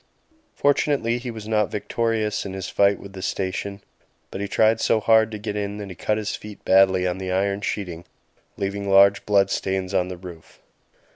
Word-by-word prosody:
Fortunately 140 Hz, -4 st, +1 dB
he 125 Hz, 0 st, -6 dB
was 110 Hz, -2 st, -7 dB
not 105 Hz, -2 st, +1 dB
victorious 110 Hz, 0 st, -1 dB
in 95 Hz, -, -6 dB
his 95 Hz, -1 st, -5 dB
"fight 100 Hz, -1 st, +3 dB
with 100 Hz, -, -11 dB
the 95 Hz, -, -8 dB
station"; 100 Hz, +1 st, -3 dB, 0.5 s
but 95 Hz, -, -5 dB
he 100 Hz, -, -2 dB
tried 110 Hz, +2 st, +3 dB
so 110 Hz, -, +3 dB
hard 110 Hz, 0 st, +4 dB
to 110 Hz, -, -6 dB
get 105 Hz, 0 st, -5 dB
in 105 Hz, 0 st, -3 dB
that 100 Hz, -1 st, -7 dB
he 90 Hz, -, -8 dB
cut 105 Hz, +4 st, -1 dB
his 105 Hz, -1 st, -3 dB
feet 105 Hz, -1 st, -11 dB
badly 95 Hz, -1 st, +4 dB
on 90 Hz, +1 st, -1 dB
the 95 Hz, -1 st, -4 dB
iron 100 Hz, +2 st, 0 dB
sheeting, 90 Hz, -4 st, -4 dB, 0.5 s
leaving 100 Hz, 0 st, -3 dB
large 100 Hz, +1 st, +5 dB
blood 100 Hz, -1 st, +3 dB
stains 95 Hz, -1 st, -2 dB
on 90 Hz, -2 st, +1 dB
the 90 Hz, -1 st, -6 dB
roof. 85 Hz, -3 st, -12 dB
100 Hz, 195 wpm, -23 LUFS, 95-105 Hz, 0.5 s, large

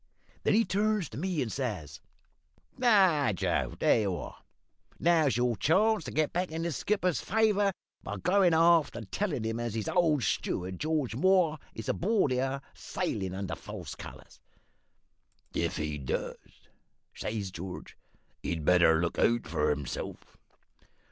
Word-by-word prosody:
Then -, -, +2 dB
he 225 Hz, +1 st, +4 dB
turns 210 Hz, -1 st, 0 dB
to 110 Hz, -, -9 dB
me 175 Hz, -4 st, -1 dB
and 115 Hz, -, -5 dB
says 90 Hz, -, -4 dB, 0.7 s
"`Now, 185 Hz, -, +4 dB
Joe, -, -, -1 dB
there -, -, +3 dB
you 100 Hz, -4 st, -1 dB
are! -, -, -7 dB, 0.6 s
Now's 160 Hz, -8 st, +3 dB
your 120 Hz, -1 st, +1 dB
chance 195 Hz, -, +2 dB
to -, -, -5 dB
get 155 Hz, 0 st, 0 dB
back 180 Hz, +1 st, -1 dB
the 165 Hz, +2 st, -3 dB
skipper's 180 Hz, +4 st, 0 dB
favour 210 Hz, -2 st, +2 dB, 0.3 s
by -, -, -5 dB
goin' 180 Hz, -2 st, +3 dB
aft 165 Hz, -3 st, +4 dB
and 110 Hz, -5 st, -8 dB
tellin' 170 Hz, -, -1 dB
him 115 Hz, +1 st, -2 dB
as 120 Hz, -2 st, -3 dB
his 110 Hz, -2 st, -3 dB
old 160 Hz, -7 st, +2 dB
steward, 90 Hz, +1 st, -2 dB
George 150 Hz, -6 st, -1 dB
Moore, 170 Hz, 0 st, +3 dB, 0.2 s
is 110 Hz, -, -7 dB
aboard 200 Hz, -, +1 dB
here, 135 Hz, +2 st, -1 dB
sailin' 95 Hz, -2 st, -3 dB
under 95 Hz, -2 st, -4 dB
false -, -, -7 dB
colours.' -, -, -12 dB, 1.1 s
"`If 85 Hz, +1 st, -1 dB
he 75 Hz, -2 st, -3 dB
does,' 65 Hz, -, -5 dB, 0.5 s
says 105 Hz, -3 st, -4 dB
George, 90 Hz, +1 st, -8 dB, 0.5 s
`he'd 80 Hz, -3 st, -3 dB
better 85 Hz, -2 st, +5 dB
look 85 Hz, 0 st, -1 dB
out 120 Hz, 0 st, +2 dB
for 75 Hz, -1 st, 0 dB
hisself!' 70 Hz, -3 st, -7 dB
140 Hz, 145 wpm, -30 LUFS, -, 1.1 s, better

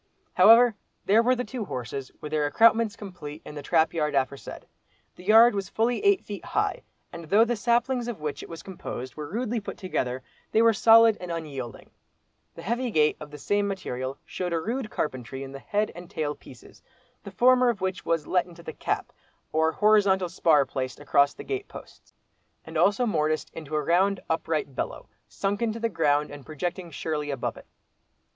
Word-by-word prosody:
However 235 Hz, +1 st, +7 dB, 0.3 s
there 215 Hz, +3 st, +5 dB
were 250 Hz, +2 st, +3 dB
the 250 Hz, -, -2 dB
two 250 Hz, -2 st, -5 dB
horses 130 Hz, -3 st, -5 dB
with 150 Hz, -, -7 dB
their 150 Hz, -1 st, +1 dB
accoutrements 225 Hz, +6 st, +4 dB
complete, 175 Hz, -8 st, -9 dB
in -, -, -9 dB
the 145 Hz, -, -6 dB
trap 160 Hz, +2 st, +2 dB
yard 150 Hz, -3 st, -1 dB
aforesaid. 135 Hz, 0 st, -3 dB, 0.5 s
The 180 Hz, -, -14 dB
yard 225 Hz, +4 st, +7 dB
was 200 Hz, -1 st, -3 dB
fully 235 Hz, -, 0 dB
eight 400 Hz, -2 st, +3 dB
feet 205 Hz, -1 st, -7 dB
high, -, -, -1 dB, 0.3 s
and 170 Hz, -1 st, -8 dB
though 205 Hz, +8 st, +4 dB
the 240 Hz, +1 st, -1 dB
saplings 240 Hz, +3 st, +1 dB
of 235 Hz, -7 st, -5 dB
which 150 Hz, -1 st, -4 dB
it -, -, -10 dB
was 165 Hz, -1 st, -9 dB
composed 130 Hz, -9 st, -7 dB
were 150 Hz, -1 st, -7 dB
rudely 235 Hz, +4 st, -2 dB
put 205 Hz, -, -7 dB
together, 130 Hz, -9 st, -3 dB, 0.3 s
they 225 Hz, -, +4 dB
were 230 Hz, -1 st, +5 dB
solid 225 Hz, 0 st, +6 dB
and 180 Hz, -1 st, -5 dB
unyielding. 140 Hz, -8 st, -6 dB, 0.6 s
The -, -, -10 dB
heavy 240 Hz, +5 st, -1 dB
gate 155 Hz, -7 st, +3 dB
of 150 Hz, -, -9 dB
the 150 Hz, -, -10 dB
same 205 Hz, +7 st, 0 dB
material 135 Hz, -9 st, -4 dB
showed 180 Hz, -2 st, -4 dB
a 165 Hz, -, +1 dB
rude 230 Hz, +6 st, -3 dB
carpentry 130 Hz, -, -4 dB
in 135 Hz, -, -8 dB
the 135 Hz, -, -8 dB
head 210 Hz, +7 st, -1 dB
and 175 Hz, 0 st, -11 dB
tail 150 Hz, -2 st, -2 dB
pieces, 125 Hz, -4 st, -16 dB, 0.4 s
the -, -, -8 dB
former 250 Hz, +5 st, +4 dB
of 230 Hz, -5 st, -1 dB
which 185 Hz, 0 st, -3 dB
was 165 Hz, -3 st, 0 dB
"let 180 Hz, -1 st, +1 dB
into 170 Hz, -1 st, -14 dB
the 160 Hz, -, -7 dB
cap" -, -, -3 dB, 0.4 s
or 160 Hz, +1 st, +2 dB
horizontal 200 Hz, -2 st, +3 dB
spar 160 Hz, -4 st, +3 dB
placed 130 Hz, -2 st, -4 dB
across 140 Hz, -1 st, +2 dB
the -, -, -9 dB
gate 400 Hz, -1 st, -4 dB
posts, -, -, -13 dB, 0.5 s
and -, -, -10 dB
also 205 Hz, +5 st, +3 dB
morticed 155 Hz, -7 st, -1 dB
into 155 Hz, -2 st, -6 dB
a 150 Hz, -, 0 dB
round 185 Hz, +5 st, +2 dB
upright 160 Hz, -4 st, -2 dB
below, -, -, -4 dB, 0.2 s
sunk 200 Hz, +2 st, -2 dB
into 230 Hz, -1 st, -1 dB
the 230 Hz, 0 st, 0 dB
ground 150 Hz, -6 st, +1 dB
and 145 Hz, -1 st, -10 dB
projecting 175 Hz, +4 st, -5 dB
securely 150 Hz, -1 st, -3 dB
above 135 Hz, -3 st, -3 dB
it. -, -, -14 dB
175 Hz, 195 wpm, -26 LUFS, 150-220 Hz, 0.6 s, However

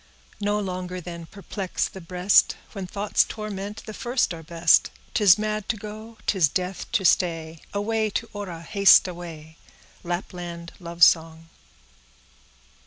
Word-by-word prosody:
No 205 Hz, 0 st, 0 dB
longer 185 Hz, -2 st, -4 dB
then 170 Hz, -1 st, -8 dB
perplex 195 Hz, 0 st, -3 dB
the 190 Hz, -, -11 dB
breast— 180 Hz, +3 st, +3 dB
When 195 Hz, -4 st, -6 dB
thoughts 200 Hz, +3 st, +1 dB
torment, 210 Hz, 0 st, -6 dB
the 215 Hz, -, -7 dB
first 240 Hz, -3 st, 0 dB
are 165 Hz, -, -8 dB
best; 165 Hz, 0 st, +3 dB, 0.2 s
'Tis 200 Hz, -3 st, +6 dB
mad 215 Hz, -1 st, -3 dB
to 220 Hz, -, 0 dB
go, 215 Hz, +2 st, -9 dB
'tis 180 Hz, -7 st, +3 dB
death 185 Hz, +3 st, -3 dB
to 205 Hz, -5 st, +1 dB
stay! 165 Hz, -3 st, +1 dB
Away, 215 Hz, +2 st, 0 dB
to 230 Hz, +3 st, -3 dB
Orra, 185 Hz, -5 st, -6 dB
haste 200 Hz, +2 st, +6 dB
away. 165 Hz, -3 st, -9 dB, 0.5 s
—Lapland 175 Hz, -1 st, -5 dB
Love 170 Hz, -1 st, -1 dB
Song. 165 Hz, 0 st, +4 dB
185 Hz, 135 wpm, -25 LUFS, 170-210 Hz, 0.5 s, Tis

